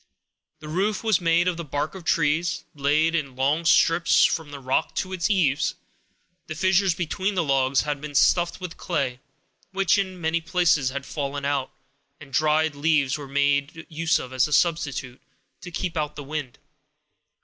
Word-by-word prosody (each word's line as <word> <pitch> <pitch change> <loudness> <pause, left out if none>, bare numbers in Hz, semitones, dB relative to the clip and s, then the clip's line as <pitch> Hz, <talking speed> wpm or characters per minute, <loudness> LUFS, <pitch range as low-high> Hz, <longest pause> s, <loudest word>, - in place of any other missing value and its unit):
The 155 - -9
roof 195 +7 -1
was 220 -5 +2
made 170 +1 +2
of 180 -2 0
the 170 - -4
bark 145 +1 -3
of 190 -2 -9
trees, 160 0 +1
laid 150 +3 +1
in 140 -6 -2
long 145 +6 0
strips 165 +1 +4
from 160 -3 -1
the 145 -1 -8
rock 130 +4 -1
to 185 0 -3
its 185 +1 -1
eaves; 165 -9 +1 0.7
the 155 - -5
fissures 185 +1 +2
between 185 +4 -2
the 180 - +1
logs 135 -2 +2
had 145 -2 -3
been 150 -1 -7
stuffed 175 +4 +3
with 180 -2 -7
clay, 140 -7 -2 0.5
which 195 0 +2
in 190 -2 -3
many 165 0 0
places 165 -5 +2
had 140 +1 -5
fallen 140 -2 -4
out, 140 -2 -1 0.5
and 135 -2 -14
dried 155 +1 +2
leaves 145 -2 +1
were 145 -2 -7
made 140 +3 0
use 160 0 +1
of 130 0 -7
as 130 +1 +2
a 150 - -4
substitute, 145 -6 0 0.4
to 180 - -8
keep 175 0 -4
out 150 -1 -2
the 145 - -7
wind. 145 -3 -5
155 Hz, 175 wpm, -24 LUFS, 140-170 Hz, 0.7 s, strips